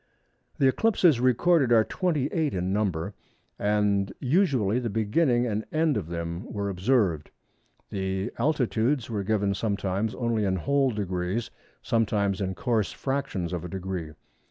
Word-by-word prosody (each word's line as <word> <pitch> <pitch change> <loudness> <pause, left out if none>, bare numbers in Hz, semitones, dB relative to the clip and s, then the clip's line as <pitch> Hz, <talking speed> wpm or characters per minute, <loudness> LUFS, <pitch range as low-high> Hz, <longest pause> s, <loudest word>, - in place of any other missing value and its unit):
The 135 - +4
eclipses 175 - +3
recorded 130 +3 +3
are 115 -2 +6
28 155 - -1
in 90 +1 -1
number 100 -3 -1 0.5
and 100 -1 +1
usually 130 - +2
the 120 -2 -2
beginning 120 +4 +2
and 110 -2 -1
end 155 -2 +2
of 95 -7 -2
them 85 +4 -5
were 100 -1 -2
observed. 95 - +1 0.6
The 95 0 -2
altitudes 125 -3 +1
are 105 -3 -1
given 100 -1 0
sometimes 100 +1 -1
only 115 -3 0
in 95 -2 +1
whole 135 - +2
degrees, 100 0 -2 0.3
sometimes 105 -3 +1
in 95 -1 -2
coarse 110 +1 0
fractions 120 -11 -3
of 90 -2 -3
a 90 - -6
degree. 90 -4 -5
105 Hz, 135 wpm, -27 LUFS, 95-130 Hz, 0.6 s, are